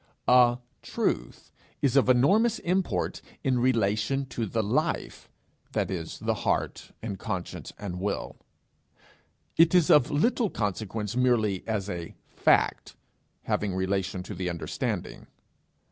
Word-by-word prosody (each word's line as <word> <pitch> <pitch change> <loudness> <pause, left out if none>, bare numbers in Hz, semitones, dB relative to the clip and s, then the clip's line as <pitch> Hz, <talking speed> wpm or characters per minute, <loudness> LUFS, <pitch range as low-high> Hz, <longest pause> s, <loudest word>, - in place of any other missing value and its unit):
A 125 -1 +6 0.2
truth - - -3 0.3
is 140 -2 +1
of 135 -2 +4
enormous 200 - +4
import 175 - -1 0.2
in 130 -2 +2
relation 115 +2 +1
to 115 -3 -3
the 110 +3 -1
life 150 +11 -1 0.4
that - - 0
is 85 -3 -4
the - - -1
heart, - - -2
and 100 -4 -4
conscience, 90 -2 -5
and 95 -4 -5
will; 100 +1 -3 1.2
it 165 +2 +6
is 175 -4 +5
of 145 -4 +6
little 220 - +2
consequence 105 - -3
merely 115 -6 +2
as 105 -3 -1
a 85 -4 -6
fact - - +2 0.5
having 100 -3 -1
relation 95 0 -1
to 105 - -7
the 90 -1 -3
understanding. 85 -2 -4
110 Hz, 125 wpm, -27 LUFS, 95-135 Hz, 1.2 s, A